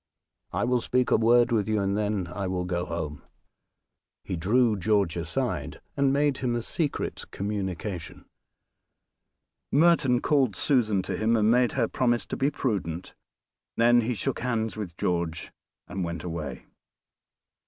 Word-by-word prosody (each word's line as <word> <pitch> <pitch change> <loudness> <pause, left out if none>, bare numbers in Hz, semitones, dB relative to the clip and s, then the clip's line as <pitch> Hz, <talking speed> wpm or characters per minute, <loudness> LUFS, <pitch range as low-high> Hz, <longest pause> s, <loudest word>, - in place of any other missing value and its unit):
I - - -1
will 125 0 +2
speak 125 +1 0
a - - +6
word 120 +2 +4
with 110 -2 +1
you, 110 -1 +2
and 100 0 0
then 105 -3 0
I 100 -1 -3
will 90 -1 -2
go 90 -1 -2
home." 80 -4 -4 1.0
He - - -3
drew 110 +7 +2
George 100 -3 +1
aside, 85 -1 -2 0.2
and 140 -1 +3
made 145 -1 +2
him 120 -2 -1
a 120 - -2
secret 155 +2 -2
communication. 95 -3 -4 1.5
Merton 145 -5 +4
called 135 -9 +2
Susan 110 -6 +2
to 95 0 -3
him, 110 +5 +2
and 110 0 +3
made 125 0 +3
her 120 -4 +1
promise 120 -2 +1
to - - -4
be 135 - +1
prudent, 95 - -3 0.6
then 120 +1 +5
he 120 +2 -1
shook 135 +4 -2
hands 115 -3 -1
with 95 -6 -6
George 85 -2 -2 0.3
and 95 +1 -3
went 85 0 -4
away. 85 -4 -5
110 Hz, 150 wpm, -27 LUFS, 90-125 Hz, 1.5 s, a